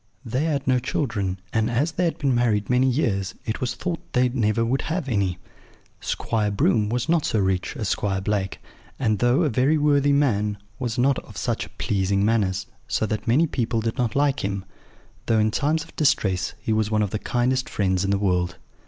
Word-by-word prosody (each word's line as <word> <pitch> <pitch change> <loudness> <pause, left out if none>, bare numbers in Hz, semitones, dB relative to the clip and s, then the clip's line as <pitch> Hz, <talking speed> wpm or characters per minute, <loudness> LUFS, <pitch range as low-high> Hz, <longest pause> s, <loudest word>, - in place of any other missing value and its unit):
They 130 +6 -1
had 145 -4 -1
no 130 -1 +4
children, 105 -8 -2
and, 110 0 +1
as 140 +8 +1
they 180 +2 0
had 165 - -1
been 140 -3 +1
married 115 -3 +1
many 130 +1 +4
years, 100 - 0
it 110 - -3
was 125 - -1
thought 175 -2 -3
they 125 0 +3
never 115 -2 +1
would 130 +4 0
have 165 -3 -2
any. 100 -7 0 0.6
Squire 110 -2 -1
Broom 105 +1 +2
was 120 +3 -1
not 165 -2 +2
so - - 0
rich 95 +6 0
as 110 -7 -2
Squire 95 -2 0
Blake, 95 -1 -1 0.4
and, 110 -6 +1
though 120 - +3
a 155 - +2
very 135 +6 +2
worthy 145 -1 +3
man, 105 -8 +2 0.2
was 120 -3 -2
not 130 +2 +3
of - - -13
such - - -3
pleasing 100 0 +1
manners, 105 -4 +1 0.2
so - - 0
that 110 0 -3
many 135 +9 +4
people 120 -6 -1
did 115 +4 -3
not 120 -3 0
like 140 0 +2
him, 100 -1 -2 0.6
though 115 - +3
in 110 0 +3
times 150 +6 +1
of - - -17
distress 95 - +1
he 110 +1 -1
was 110 -1 +1
one 110 -1 +2
of 100 - -2
the 110 - -2
kindest 125 +3 0
friends 95 -2 0
in 100 - -1
the 100 - +2
world. 90 -2 0
115 Hz, 205 wpm, -24 LUFS, 100-135 Hz, 0.6 s, no